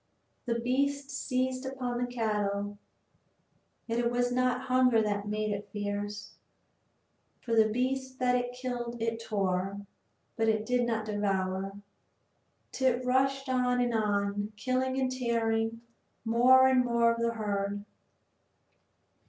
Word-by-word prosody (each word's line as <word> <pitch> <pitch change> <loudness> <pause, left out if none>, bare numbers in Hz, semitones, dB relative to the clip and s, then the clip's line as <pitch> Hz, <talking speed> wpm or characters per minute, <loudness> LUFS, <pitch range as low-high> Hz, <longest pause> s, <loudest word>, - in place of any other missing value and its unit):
The 235 -1 +1
beast 280 +3 0
seized 255 -1 -1
upon 255 -2 -3
the 245 0 -2
cattle. 205 -3 -1 1.1
Yet 230 0 -1
it 235 0 +2
was 245 0 0
not 250 0 +1
hunger 255 -2 +4
that 205 -1 -1
made 215 0 -1
it 205 0 -4
fierce, 205 0 -4 1.0
for 230 - -4
the 220 -1 +5
beasts 260 +3 -1
that 250 -1 +1
it 245 0 0
killed 240 -2 -4
it 230 0 -2
tore, 195 -1 -1 0.5
but 220 -2 +1
did 245 0 +1
not 220 -2 -1
devour. 195 -2 -1 1.0
Tit 255 -1 +1
rushed 270 +2 +1
on 250 -1 +1
and 245 -1 +1
on, 205 -1 0
killing 260 +3 0
and 260 -1 0
tearing 230 -2 0 0.4
more 250 +3 +6
and 260 -1 +4
more 235 -1 +3
of 230 - -5
the 235 0 +1
herd. 205 -2 -2
235 Hz, 130 wpm, -30 LUFS, 210-255 Hz, 1.1 s, more